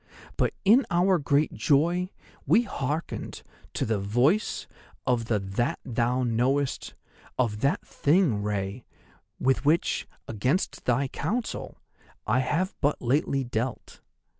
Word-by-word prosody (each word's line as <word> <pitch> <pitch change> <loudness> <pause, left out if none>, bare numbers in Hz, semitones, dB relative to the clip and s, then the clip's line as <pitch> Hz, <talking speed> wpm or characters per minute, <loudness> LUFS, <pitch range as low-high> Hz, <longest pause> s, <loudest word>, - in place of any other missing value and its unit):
But - - 0
in 230 +7 +6
our 180 +1 +3
great 145 +1 +1
joy 165 +10 +2 0.4
we 235 - +5
hearkened 150 - -4 0.3
to - - 0
the 110 -2 0
Voice 120 - +1 0.4
of 120 -3 +1
That 105 0 -1
thou 125 +1 0
knowest, 125 +4 0 0.4
of 115 -5 0
that 140 +5 0
Thing, 145 - +2
Rei, 100 +2 -3 0.6
with 135 +1 +2
which, 155 +4 +1 0.2
against 125 - -1
thy 130 +3 +2
counsel, 215 - -3 0.5
I 125 - +2
have 150 +9 0
but 145 +1 +1
lately 135 +2 +1
dealt. 120 0 -4
130 Hz, 115 wpm, -27 LUFS, 115-155 Hz, 0.6 s, in